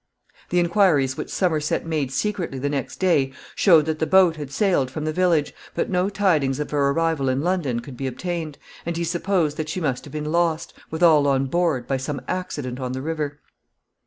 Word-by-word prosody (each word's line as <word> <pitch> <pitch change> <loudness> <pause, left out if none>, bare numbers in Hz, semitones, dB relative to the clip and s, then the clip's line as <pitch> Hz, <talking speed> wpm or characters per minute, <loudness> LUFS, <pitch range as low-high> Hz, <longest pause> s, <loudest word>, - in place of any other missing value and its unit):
The 180 - 0
inquiries 170 -7 +3
which - - -5
Somerset 160 -5 0
made 155 -5 -1
secretly 185 -3 -2
the 145 +2 -2
next 140 -3 -3
day 145 -8 +2 0.2
showed 165 -6 +5
that 155 -1 -2
the 160 - 0
boat 185 -1 +5
had 145 -3 -6
sailed 140 -4 +1
from 150 +4 -5
the 155 - -1
village, 170 -4 +2 0.2
but - - -1
no 180 +1 +1
tidings 165 -10 +1
of 150 - -4
her 140 -2 +2
arrival 160 -2 +1
in 130 +1 0
London 165 -10 0
could 125 +1 -10
be 135 - -3
obtained, 160 +3 -4 0.3
and 170 0 -3
he 170 - -1
supposed 170 -2 0
that 155 -1 -3
she 185 - -2
must 135 -7 -2
have 145 - -11
been 150 0 -4
lost, 165 -1 0 0.2
with 160 +2 -3
all 155 -4 +6
on 135 -1 +2
board, 155 -4 0
by 135 - 0
some 140 +1 -4
accident 145 -9 -4
on 130 -1 -3
the 130 - -4
river. 150 -2 -3
155 Hz, 205 wpm, -23 LUFS, 140-175 Hz, 0.3 s, all